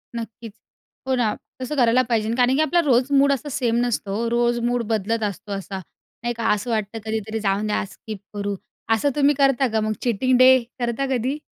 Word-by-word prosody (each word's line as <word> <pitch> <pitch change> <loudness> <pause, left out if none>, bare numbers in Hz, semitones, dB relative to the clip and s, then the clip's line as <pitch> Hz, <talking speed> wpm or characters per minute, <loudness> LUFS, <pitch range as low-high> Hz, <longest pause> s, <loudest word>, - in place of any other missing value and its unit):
नक्कीच. 230 -1 -7 0.5
हो 260 - +2
ना! 230 -4 +1 0.3
तसं 255 +4 -3
करायला 245 -2 +4
पाहिजे 220 -2 +1
कारण 250 +1 +3
की 300 - +2
आपला 345 +3 +2
रोज 255 0 +3
मूड 280 0 +4
असं 280 +2 -4
सेम 235 -3 +1
नसतो. 215 -4 -2
हो, 230 +2 -1
रोज 240 0 +1
मूड 245 -1 0
बदलत 220 +2 -1
असतो 205 0 -4
असा 195 0 -4 0.4
नाही 240 0 -1
का? 230 - -1
असं 210 +4 -3
वाटतं 215 0 -2
कधीतरी 220 0 -3
जाऊन 200 +2 +1
द्या, 210 - 0
स्किप 215 -3 -8
करू. 205 -1 -3 0.4
असं 285 +6 +1
तुम्ही 290 0 +3
करता 270 -1 +3
का 220 - +2
मग? 215 0 0
चीटिंग 250 +2 +2
डे 255 +1 +8 0.3
करता 240 +2 -1
कधी? 255 +5 -2
235 Hz, 200 wpm, -22 LUFS, 215-255 Hz, 0.5 s, डे